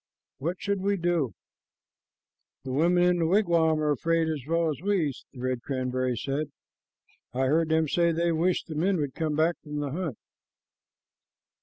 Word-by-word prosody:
What 170 Hz, +6 st, -2 dB
should 200 Hz, -1 st, -1 dB
we 200 Hz, +1 st, +1 dB
do?" 170 Hz, -, 0 dB, 1.3 s
"The 130 Hz, -, -5 dB
women 175 Hz, +6 st, +3 dB
in 180 Hz, 0 st, +3 dB
the 165 Hz, -, +2 dB
wigwam 170 Hz, -4 st, +3 dB
are 150 Hz, -, +2 dB
afraid 165 Hz, +3 st, +1 dB
as 150 Hz, -4 st, -3 dB
well 165 Hz, 0 st, +2 dB
as 150 Hz, -, -6 dB
we," 185 Hz, -7 st, +1 dB, 0.2 s
the 130 Hz, -, -12 dB
red 130 Hz, -1 st, -1 dB
cranberry 130 Hz, -1 st, -1 dB
said. 140 Hz, +5 st, -2 dB, 0.9 s
"I 130 Hz, +1 st, +2 dB
heard 160 Hz, +4 st, +2 dB
them 160 Hz, 0 st, +2 dB
say 170 Hz, +3 st, +2 dB
they 170 Hz, +1 st, +1 dB
wished 170 Hz, +3 st, +1 dB
the 160 Hz, -, -7 dB
men 180 Hz, +5 st, +1 dB
would 145 Hz, -4 st, -2 dB
come 155 Hz, -2 st, -1 dB
back 160 Hz, +3 st, +2 dB
from 150 Hz, -1 st, -8 dB
the 145 Hz, -2 st, -2 dB
hunt." 160 Hz, -5 st, -3 dB
160 Hz, 170 wpm, -27 LUFS, 140-175 Hz, 1.3 s, women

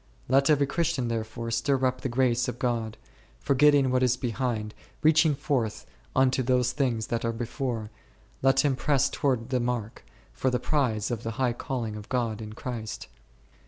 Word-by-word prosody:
Let 135 Hz, +3 st, +3 dB
every 145 Hz, -2 st, +4 dB
Christian 150 Hz, -5 st, -1 dB
therefore 115 Hz, +1 st, -3 dB
stir 130 Hz, +3 st, +1 dB
up 125 Hz, 0 st, 0 dB
the 130 Hz, -, -2 dB
grace 125 Hz, -1 st, +2 dB
of 125 Hz, -1 st, -4 dB
God; 120 Hz, -4 st, -2 dB, 0.4 s
forgetting 140 Hz, -1 st, +4 dB
what 130 Hz, 0 st, +2 dB
is 125 Hz, -1 st, +3 dB
behind, 120 Hz, -4 st, -2 dB, 0.3 s
reaching 155 Hz, -1 st, +5 dB
forth 125 Hz, -7 st, -2 dB, 0.3 s
unto 130 Hz, 0 st, +3 dB
those 125 Hz, -1 st, +2 dB
things 125 Hz, -5 st, -1 dB
which 115 Hz, -1 st, -1 dB
are 115 Hz, -, +1 dB
before, 115 Hz, -1 st, -4 dB, 0.5 s
let 135 Hz, 0 st, +4 dB
him 140 Hz, -2 st, +2 dB
press 135 Hz, 0 st, +2 dB
toward 130 Hz, -4 st, 0 dB
the 130 Hz, -, +2 dB
mark, 120 Hz, -3 st, -3 dB, 0.3 s
for 130 Hz, -, 0 dB
the 125 Hz, -, +1 dB
prize 125 Hz, -8 st, 0 dB
of 115 Hz, -3 st, -2 dB
the 115 Hz, -1 st, -4 dB
high 125 Hz, -2 st, +1 dB
calling 120 Hz, -3 st, -4 dB
of 105 Hz, -1 st, -9 dB
God 115 Hz, -4 st, -1 dB
in 105 Hz, -1 st, -7 dB
Christ. 110 Hz, -2 st, -6 dB
125 Hz, 170 wpm, -27 LUFS, 115-135 Hz, 0.5 s, reaching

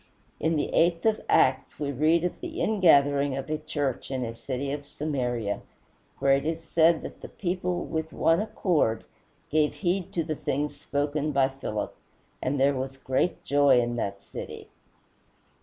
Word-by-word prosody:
In 160 Hz, +2 st, +1 dB
the 145 Hz, -, -1 dB
eighth 170 Hz, +1 st, +3 dB
of 220 Hz, -1 st, +2 dB
Acts -, -, +3 dB
we 145 Hz, -2 st, -1 dB
read 155 Hz, +5 st, +3 dB
of 180 Hz, -, -2 dB
the 350 Hz, -1 st, -5 dB
ingathering 145 Hz, -8 st, +4 dB
of 135 Hz, +3 st, -5 dB
a 155 Hz, -, -1 dB
church 145 Hz, -4 st, -3 dB
in 130 Hz, -2 st, -2 dB
a 115 Hz, -, -5 dB
city 135 Hz, +3 st, -4 dB
of 145 Hz, 0 st, -5 dB
Samaria, 125 Hz, -9 st, -2 dB, 0.6 s
where 135 Hz, 0 st, +3 dB
it 135 Hz, 0 st, +2 dB
is 165 Hz, +1 st, -2 dB
said 165 Hz, 0 st, +3 dB
that -, -, -8 dB
"the -, -, -7 dB
people, 180 Hz, -1 st, -2 dB
with 160 Hz, 0 st, -3 dB
one 165 Hz, +4 st, +3 dB
accord, 170 Hz, -, +1 dB, 0.5 s
gave 150 Hz, 0 st, +2 dB
heed 185 Hz, 0 st, -1 dB
to 170 Hz, -, 0 dB
the 155 Hz, 0 st, -3 dB
things 145 Hz, +1 st, -2 dB
spoken 145 Hz, +1 st, -1 dB
by 135 Hz, -1 st, +3 dB
Philip, 135 Hz, -6 st, -4 dB, 0.5 s
and 140 Hz, +2 st, -1 dB
there 140 Hz, +1 st, +4 dB
was 135 Hz, 0 st, -4 dB
great 135 Hz, +6 st, -1 dB
joy 140 Hz, -3 st, +5 dB
in 120 Hz, 0 st, -1 dB
that 100 Hz, -3 st, -3 dB
city." -, -, -8 dB
145 Hz, 170 wpm, -27 LUFS, 135-165 Hz, 0.6 s, joy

